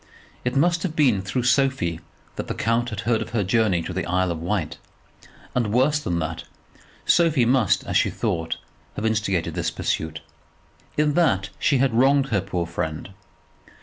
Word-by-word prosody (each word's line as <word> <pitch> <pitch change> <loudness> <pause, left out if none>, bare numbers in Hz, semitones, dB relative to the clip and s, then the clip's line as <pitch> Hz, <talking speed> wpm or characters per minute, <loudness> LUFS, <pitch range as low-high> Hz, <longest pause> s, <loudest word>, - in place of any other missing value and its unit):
It 125 +1 -1
must 170 +4 +3
have 165 -4 -3
been 125 -11 +3
through 105 +6 -2
Sophie 125 - +1 0.4
that - - -5
the - - -3
count 115 +2 0
had 110 - -4
heard 115 0 +1
of - - -5
her 110 -3 +1
journey 95 -3 +2
to - - -5
the - - -3
Isle 90 0 +1
of 80 -1 -4
Wight; 85 -2 -2 0.8
and, 120 -4 0
worse 135 +6 +3
than 90 -12 -2
that, 80 0 -3 0.6
Sophie 160 -8 +4
must, 120 -5 +3
as - - 0
she - - +3
thought, 80 0 -2 0.4
have 105 - -3
instigated 105 -6 0
this - - -1
pursuit. 80 +1 -3 0.8
In 150 0 +2
that 100 - +2
she 145 - +3
wronged 135 +2 +3
her 100 -4 +1
poor 90 -2 -2
friend. 80 +1 -4
110 Hz, 170 wpm, -23 LUFS, 90-135 Hz, 0.8 s, Sophie